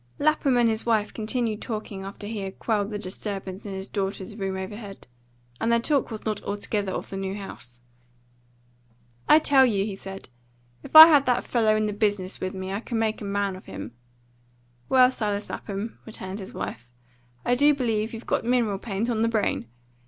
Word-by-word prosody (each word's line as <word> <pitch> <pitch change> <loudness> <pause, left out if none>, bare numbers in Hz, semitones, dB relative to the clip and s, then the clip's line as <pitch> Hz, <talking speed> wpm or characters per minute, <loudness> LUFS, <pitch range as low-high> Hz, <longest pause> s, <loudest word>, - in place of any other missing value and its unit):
LAPHAM 290 -3 +2
and 240 -1 +4
his 220 0 0
wife 220 -3 +1
continued 220 -1 -2
talking 215 -4 -5
after 195 +1 -8
he 215 0 -4
had 195 -1 -6
quelled 210 -3 0
the 210 - -3
disturbance 195 0 -6
in 195 - -5
his 190 +1 -5
daughters' 195 0 -4
room 195 -2 -3
overhead; 200 +1 -7 0.5
and 230 - +1
their 235 - +4
talk 280 +3 +1
was 220 -2 -7
not 215 -2 -2
altogether 205 -1 -2
of - - -5
the - - -4
new 195 0 -3
house. 125 -12 -8 1.5
"I 300 - +9
tell 280 -3 +5
you," 205 -6 +2
he 205 -2 -4
said, 195 -5 -8 0.5
"if - - -11
I 315 0 +15
had 290 -4 +5
that 250 -1 +2
fellow 220 -3 +2
in 215 0 +1
the 210 - -2
business 205 -2 -1
with 185 +1 -3
me 190 0 -5
I 195 - -1
would 235 - -14
make 225 -1 0
a - - -5
man 200 -1 -1
of 185 - -12
him." 115 - -7 1.0
"Well, 255 -1 +6
Silas 210 -4 -2
Lapham," 205 +3 -5
returned 195 -2 -6
his 190 - -7
wife, 120 +1 -6 0.6
"I 245 - +3
do 285 +4 +5
believe 225 -4 -1
you've 225 0 -8
got - - 0
mineral 230 -5 +1
paint 210 +1 -2
on 230 -3 0
the 230 - +3
brain. 215 - 0
210 Hz, 195 wpm, -25 LUFS, 195-230 Hz, 1.5 s, I